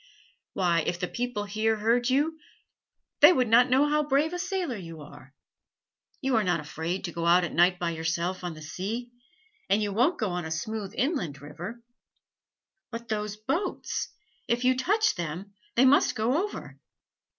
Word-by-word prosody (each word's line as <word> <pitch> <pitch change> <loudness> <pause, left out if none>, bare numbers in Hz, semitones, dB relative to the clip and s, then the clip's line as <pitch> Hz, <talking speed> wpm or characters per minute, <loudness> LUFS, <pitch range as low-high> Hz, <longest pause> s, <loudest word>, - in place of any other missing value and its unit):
"Why, 175 -3 +2
if 175 - -1
the 180 - -1
people 245 -2 -3
here 215 +2 0
heard 235 +3 +1
you 300 +5 +1 0.8
they - - +9
would 255 -8 +2
not 235 +3 +5
know 270 +4 +4
how 300 +1 +2
brave 295 +3 +1
a 355 - -3
sailor 370 -7 -2
you 165 -5 -8
are. 145 -2 -14 0.9
You 265 -2 +1
are 220 - +3
not 180 -3 +1
afraid 160 +4 -4
to 175 - -4
go 170 +1 -2
out 175 +1 +5
at 175 - -3
night 180 +1 +4
by 175 -1 -1
yourself 170 +3 -2
on 175 -2 -4
the 155 - -10
sea, 220 +9 -4 0.6
and 200 - +4
you 205 -1 -2
won't 250 - +2
go 215 -5 0
on 175 0 -2
a 160 - -5
smooth 200 +5 -4
inland 235 - -1
river 175 - -8 0.6
" 390 - -60
"But 230 0 -7
those 210 -1 -2
boats: 275 - -2 0.4
if 240 +1 0
you 255 0 +4
touch 415 +12 +2
them 175 +4 -5 0.2
they 255 - +5
must 275 +2 +4
go 250 - +1
over." 415 - -9
215 Hz, 180 wpm, -27 LUFS, 175-255 Hz, 0.9 s, they